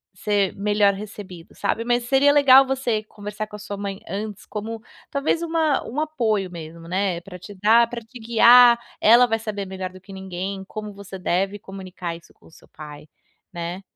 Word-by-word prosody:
ser 200 0 0
melhor 205 0 +2
recebido, 195 -4 -10
sabe. 230 - -2
Mas 240 0 +1
seria 275 +3 +4
legal 275 -2 +7
você 255 -5 -1
conversar 210 0 -7
com 210 - -11
a - - -9
sua 205 -1 -7
mãe 200 -1 -5
antes, 205 +2 -5
como 220 +1 -6 0.3
talvez 290 +4 0
uma 325 -3 0
um 270 +6 -3
apoio 220 -11 -1
mesmo, 165 0 -10
né, 185 -1 -1
pra 180 +1 -11
te 205 +3 -11
dar, 225 +4 +4
pra 235 0 -6
te 230 +3 -13
guiar, 235 +1 +7 0.2
ela 235 +3 +6
vai 225 -1 0
saber 210 -2 -5
melhor 185 -1 -6
do 185 0 -14
que 190 +2 -14
ninguém, 190 +1 -6
como 215 -1 -7
você 195 -1 -9
deve 195 +3 -1
comunicar 185 -3 -7
isso 170 - -20
com - - -23
o - - -19
seu - - -19
pai, 150 0 -11 0.5
né. 175 +2 -5
205 Hz, 190 wpm, -22 LUFS, 190-235 Hz, 0.5 s, legal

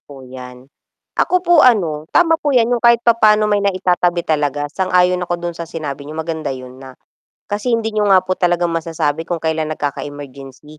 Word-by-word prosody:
po 135 -2 -14
'yan. 125 0 -11 0.5
Ako 365 0 0
po 345 -3 +5
ano 165 -11 +2
tama 325 - +2
po 285 -3 0
'yan 235 0 +3
'yung 240 - 0
kahit 235 0 +4
papaano 215 -2 +4
may 205 -1 +1
naitatabi 180 -3 0
talaga, 145 -2 -1
sang-ayon 180 -1 +1
ako 175 0 -2
do'n 175 - -2
sa 170 -1 -8
sinabi 145 -3 -6
niyo, 155 - -8
maganda 160 -2 -4
yo'n 130 -1 -8
na 135 -1 -10 0.6
kasi 210 +4 -1
hindi 225 -1 -1
niyo 210 -1 0
nga 190 -2 +5
po 185 0 -3
talaga 175 -1 +1
masasabi 165 -1 -2
kung 170 -2 -4
kailan 160 -1 -1
nagkaka-emergency, 145 0 -8
170 Hz, 185 wpm, -17 LUFS, 145-210 Hz, 0.6 s, po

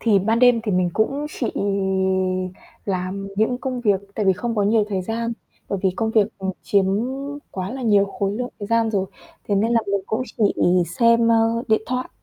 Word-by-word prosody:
Thì 215 -4 +4
ban 220 +4 +1
đêm 245 -2 +5
thì 210 -4 -1
mình 180 -1 +2
cũng 275 +7 0
chỉ 240 - -3 1.4
làm 195 +1 -3
những 225 +4 +1
công 255 -2 -3
việc 205 -5 +2
tại 210 - -1
vì 190 - +6
không 230 +5 -3
có 205 - +2
nhiều 210 +1 +3
thời 190 -3 -1
gian, 230 +3 -2 0.4
bởi 200 - -2
vì 190 - +3
công 220 -1 0
việc, 215 -3 +4
ừm, 190 0 -2
chiếm 200 -2 +2 0.7
quá 185 +1 -4
là 265 - -5
nhiều 205 -4 +4
khối 200 0 -2
lượng 245 +4 -3
thời 205 - -5
gian 230 0 +2
rồi, 195 -2 0 0.4
thế 205 - +2
nên 220 +4 +2
là 230 - +4
mình 200 0 0
cũng 225 +4 -1 0.2
chỉ - - +1 0.6
xem, 230 -1 +5
ơ, 230 +1 +3
điện 220 0 +3
thoại. 255 0 -2
220 Hz, 205 wpm, -22 LUFS, 200-230 Hz, 1.4 s, vì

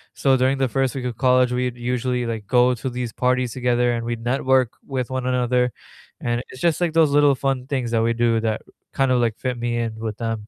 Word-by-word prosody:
so 135 -1 +3
during 130 +2 +2
the 130 -2 +1
first 135 +1 0
week 130 - -4
of 120 -3 -4
college, 125 -1 +3
we'd 125 -1 -1
usually, 125 0 -1
like, 110 -3 -4
go 125 0 +4
to 130 +3 -4
these 120 -2 -4
parties 125 -1 0
together, 125 -1 +1
and 115 0 -3
we'd 120 -1 -3
network 130 -1 +2 0.2
with 130 -3 -3
one 130 -1 -2
another, 125 -1 +1 0.5
and 120 0 -1
it's 130 - -11
just 170 -1 +2
like 170 -2 +1
those 160 -3 +4
little 145 -1 +4
fun 135 -1 -2
things 130 -5 -2
that 115 -1 +2
we 115 0 +2
do 115 -1 +2
that 110 -1 -1 0.3
kinda 135 -2 +2
like 115 -2 +1
fit 125 -2 -3
me 120 0 -1
in 115 -2 -2
with 110 -2 -4
them. 115 -2 -4
125 Hz, 230 wpm, -22 LUFS, 120-130 Hz, 0.5 s, go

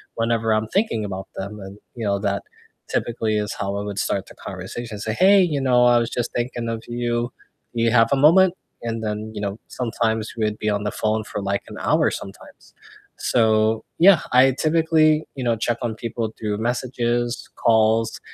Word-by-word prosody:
whenever 115 -1 +1
I'm 110 0 0
thinking 190 - 0
about 95 -1 -5
them 100 +2 -6
and, 95 0 -9 0.2
you 115 -2 -4
know, 100 -1 +1
that 100 -1 -1 0.5
typically 110 -2 -1
is 105 -1 -2
how 100 0 -3
I - - -2
would 100 -1 -4
start 100 - -1
the - - -14
conversation. 115 -3 -7
Say, 110 +1 -2
"Hey, 195 - +6
you 160 -6 +1
know, 125 -2 +4
I 120 0 +5
was 115 0 -1
just 120 -1 -3
thinking 120 -1 -2
of 115 0 -4
you. 120 0 -2 0.4
Do 115 - 0
you 115 - +3
have 115 -1 +5
a - - +5
moment?" 170 +6 +6 0.3
And 115 -1 -3
then, 105 0 -3
you 105 - -5
know, 100 +1 -3
sometimes 115 -2 -2
we'd 105 -1 -1
be 110 - 0
on 105 0 -1
the 105 - -2
phone 110 0 -1
for, 105 - -5
like, 100 0 -1
an - - -9
hour - - +2
sometimes. 100 0 -10 0.4
So 110 -1 +2
yeah, 180 0 +7
I 130 +1 +6
typically, 155 +1 +2
you 130 - -4
know, 120 -2 +2
check 115 +1 -1
on 115 -2 -2
people 115 -1 -4
through 105 -2 -2
messages, 120 0 -1
calls 110 0 +2
115 Hz, 195 wpm, -22 LUFS, 110-120 Hz, 0.5 s, yeah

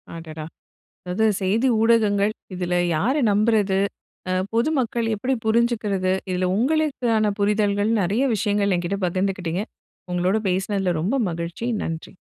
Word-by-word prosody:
அடடா! 160 -2 -7 0.6
அதாவது 210 +5 +1 0.2
செய்தி 210 +7 +2
ஊடகங்கள் 215 -3 +3 0.2
இதில 180 -1 -2 0.2
யார 230 +12 +1 0.2
நம்புறது 205 -2 +2 0.5
அ - - +1 0.2
பொதுமக்கள் 235 -2 0
எப்படி 255 +6 -1
புரிஞ்சிக்கிறது? 220 -5 +1 0.2
இதுல 185 0 0
உங்களுக்கான 245 -5 +1
புரிதல்கள் 205 0 +1
நிறைய 200 +8 +1
விஷயங்கள் 205 -1 +1
எங்கிட்ட 175 +3 -2
பகிர்ந்துக்கிட்டீங்க. 185 0 -1 0.5
உங்களோட 180 +3 +1
பேசுனதுல 190 -1 0
ரொம்ப 200 +11 0 0.2
மகிழ்ச்சி. 170 +7 -4 0.2
நன்றி. 165 +4 -6
200 Hz, 110 wpm, -23 LUFS, 185-225 Hz, 0.6 s, ஊடகங்கள்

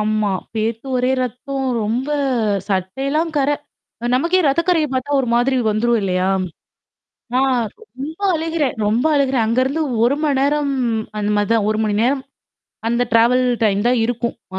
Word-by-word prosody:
ஆமா, 215 -1 +1 0.2
பேத்து 225 +3 -2
ஒரே 250 +1 +1
ரத்தம். 270 +2 -4 0.2
ரொம்ப 245 +6 -1 0.6
சட்டையெல்லாம் 270 - -1
கரை. 285 +1 +2 0.6
நமக்கே 340 +8 +2
ரத்தக்கரைய 335 +2 +2
பாத்தா 260 +2 -2
ஒரு 250 - -2
மாதிரி 255 +2 +2
வந்துரும் 230 +2 +1
இல்லையா? 185 -1 0 1.1
நான் 260 0 +3 0.2
ரொம்ப 315 - -9
அழுகிறேன், 320 -5 -1
ரொம்ப 230 +8 +1
அழுகிறேன் 270 -4 +2
அங்கேருந்து 260 +7 +1 0.2
1 240 +4 +4
மணி 290 -3 +1
நேரம் 285 0 +1 0.5
அந்த 210 0 -1
மாதிரிதான். 205 +1 +1
1 215 - -1
மணி 210 -1 0
நேரம் 265 +3 +1 0.7
அந்த 235 +1 +1
ட்ராவல் 240 +3 +4 0.2
டைம் 200 -2 +2
தான் 245 0 +3
இருக்கும். 235 0 -2 0.2
ஆ, - - -2
255 Hz, 140 wpm, -19 LUFS, 225-280 Hz, 1.1 s, 1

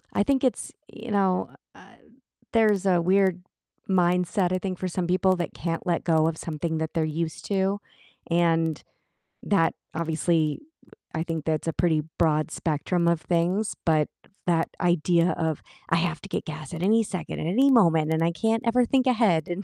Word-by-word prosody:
I - - +3
think 270 +4 +1
it's 255 - -1 0.2
you 235 +2 -9
know 195 -3 +1 0.2
uh - - -18 0.7
there's 215 -4 +3
a 180 -2 +4
weird 185 0 +2 0.5
mindset, 180 0 +2
I 185 - +1
think 185 -1 -4
for 185 - -3
some 180 0 -2
people 185 +1 +2
that 175 -3 -4
can't 165 +2 -4
let 175 -2 0
go 160 -2 +3
of 165 - -3
something 160 0 -3
that 160 0 -3
they're 165 -2 +1
used 160 +1 -4
to, 195 0 0 0.5
and 165 -2 +1 0.6
that 165 -5 +2 0.2
obviously, 160 -1 0 0.6
I 160 - -1
think 165 -2 -4
that's 160 0 -1
a 165 - 0
pretty 160 -3 +1 0.2
broad 155 -2 +2
spectrum 170 +2 -1
of 170 -1 0
things, 180 +5 0
but 155 -2 +3 0.4
that 165 -2 +2
idea 175 0 +2
of, 160 -2 -1 0.3
"I - - +3
have 170 -1 -1
to - - -11
get - - -3
gas 155 +2 -7
at 165 - -5
any 220 +4 +4
second, 190 -4 -5
at - - -3
any 255 +11 +4
moment, 165 -10 +4
and 160 +1 +1
I 170 - +2
can't 225 +6 0
ever 240 +1 +3
think 260 +2 +2
ahead, 215 -11 +2
and 175 +3 -4
175 Hz, 180 wpm, -25 LUFS, 160-195 Hz, 0.7 s, a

